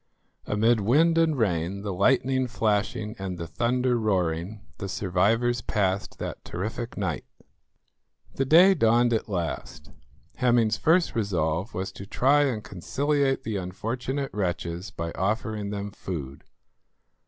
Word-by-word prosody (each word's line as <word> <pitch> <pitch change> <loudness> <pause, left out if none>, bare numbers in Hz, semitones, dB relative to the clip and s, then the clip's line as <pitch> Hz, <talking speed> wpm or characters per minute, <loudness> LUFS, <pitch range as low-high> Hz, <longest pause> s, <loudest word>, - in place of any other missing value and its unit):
Amid 110 +2 +3
wind 150 +11 +3
and 160 -3 +2
rain, 95 -3 -1
the 100 -2 -3
lightning 130 +6 +2
flashing 110 -1 -1
and 95 -2 -4
the 85 - -5
thunder 125 +5 0
roaring, 95 -1 -1 0.2
the 100 -2 -4
survivors 110 +6 +1
passed 100 -3 -1
that - - -6
terrific 110 +6 -5
night. 90 -7 -2 1.1
The 135 - 0
day 175 +7 +7
dawned 120 -5 +3
at 110 - -1
last. 85 -5 -4 0.5
Hemming's 120 -3 +3
first 170 +2 +3
resolve 90 -3 -1
was 95 +2 -3
to 100 +1 -10
try 145 +6 +3
and 115 -6 -2
conciliate 135 - 0
the 110 -2 -2
unfortunate 120 +9 -3
wretches 90 -1 -3
by 85 -4 -5
offering 105 +2 -2
them 100 0 -4
food. 75 -9 -7
105 Hz, 130 wpm, -26 LUFS, 95-125 Hz, 1.1 s, day